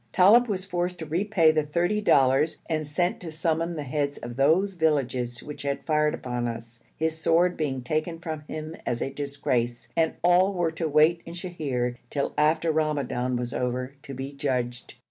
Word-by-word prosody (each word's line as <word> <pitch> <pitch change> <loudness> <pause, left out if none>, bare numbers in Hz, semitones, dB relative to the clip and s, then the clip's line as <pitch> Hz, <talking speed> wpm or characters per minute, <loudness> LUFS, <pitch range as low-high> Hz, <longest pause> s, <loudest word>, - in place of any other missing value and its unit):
Talib 220 +7 +6
was 190 -3 -2
forced 180 -1 -2
to 160 - -6
repay 170 +1 +3
the 155 0 +2
thirty 175 +8 0
dollars 135 -4 +3
and 155 -2 -1
sent 175 +5 0
to 170 -3 -7
summon 165 +1 -1
the 150 - -4
heads 145 +1 -2
of 120 0 -7
those 165 +9 +3
villages 130 -7 0
which 150 - -8
had 140 0 -3
fired 150 -1 +2
upon 120 -1 -3
us, 115 0 -7 0.2
his 160 0 -1
sword 175 +3 +3
being 135 -5 -2
taken 155 +5 -1
from 160 -2 -5
him 155 +1 -6
as 120 - -2
a 135 - -4
disgrace, 130 -4 -2
and 165 -1 +2
all 180 +3 +4
were 170 -2 +1
to 160 0 -2
wait 155 +3 +4
in 170 - -7
Sheher, 140 -9 -3
till 140 -1 -2
after 155 +2 +2
Ramadan 140 -5 0
was 120 +1 -3
over, 125 +1 -2
to 140 -2 -8
be 135 +2 -5
judged. 125 -4 -3
155 Hz, 185 wpm, -26 LUFS, 130-170 Hz, 0.2 s, Talib